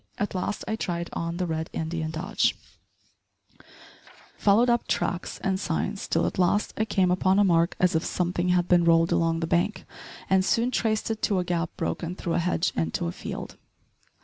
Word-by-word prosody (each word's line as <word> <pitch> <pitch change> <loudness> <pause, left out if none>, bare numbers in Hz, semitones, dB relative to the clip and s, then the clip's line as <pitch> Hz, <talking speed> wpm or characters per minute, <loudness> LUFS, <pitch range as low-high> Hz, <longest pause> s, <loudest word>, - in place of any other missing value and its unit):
At 205 - -2
last 185 +2 -3
I 220 - -1
tried 170 -5 -3
on 170 0 -3
the 180 - -1
Red 160 -1 -3
Indian 160 0 -3
dodge 180 +7 0 1.8
followed 215 +4 +4
up 240 -1 +1
tracks 175 - -2
and 190 -1 0
signs, 195 +2 -2
till 165 - +1
at - - -3
last 185 +3 +2
I 220 - 0
came 190 -4 +2
upon 185 +1 +2
a 205 - +5
mark 170 -3 +3
as 180 -1 +3
if 160 0 +1
somethin' 180 0 -1
had 180 -1 +2
bin 175 -1 +4
rolled 165 0 +4
along 165 0 +1
the - - 0
bank, 175 +6 0 0.4
and 190 0 +3
soon 235 +5 +1
traced 220 -2 0
it 220 - -4
to 200 - +1
a 180 - +1
gap 175 -1 -1
broken 175 +1 -3
through 170 -3 -3
a - - +2
hedge 170 -1 0
into 80 +1 -1
a 85 - -2
field. - - -7
180 Hz, 190 wpm, -26 LUFS, 165-195 Hz, 1.8 s, a